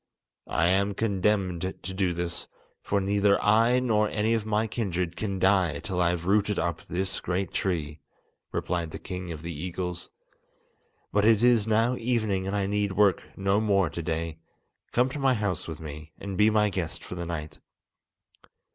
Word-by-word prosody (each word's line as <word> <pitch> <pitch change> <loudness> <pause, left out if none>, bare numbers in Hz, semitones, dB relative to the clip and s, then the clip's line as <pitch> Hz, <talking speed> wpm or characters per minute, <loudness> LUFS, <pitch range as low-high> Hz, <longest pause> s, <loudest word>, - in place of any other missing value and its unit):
"I 85 - +2
am 100 +2 +2
condemned 100 -4 +1
to 95 0 -4
do 95 -2 +1
this, 85 0 -3 0.3
for 100 - 0
neither 100 +1 +3
I 115 +4 +4
nor 105 -4 +2
any 110 +1 +1
of 110 -2 -1
my 110 +1 +1
kindred 90 -6 -2
can 100 -3 -3
die 95 -3 +3
till 95 -4 -2
I 85 - +4
have 85 -1 -2
rooted 105 +1 +2
up 85 -1 -1
this 95 +2 -2
great 90 0 -2
tree," 80 -5 -2 0.5
replied 85 -2 -2
the - - -6
king 90 -2 -6
of 80 -1 -7
the 85 0 -4
eagles. 90 +2 -4 1.0
"But 105 - +3
it 110 0 +5
is 120 -3 +4
now 115 +3 +2
evening, 110 -6 0
and 100 - -1
I 100 -1 +1
need 100 0 0
work 100 -2 +4 0.2
no 100 +2 +2
more 100 -6 +2
to 85 - -4
day. 80 0 -3 0.5
Come 125 +1 +3
to 145 - -5
my 135 -2 +3
house 100 -6 -2
with 80 -2 -6
me, 75 0 -9
and 100 -1 -6
be 105 +3 +5
my 105 -1 +3
guest 90 -4 -4
for - - -8
the 85 -1 -5
night." 75 -3 -5
95 Hz, 180 wpm, -27 LUFS, 85-105 Hz, 1.0 s, it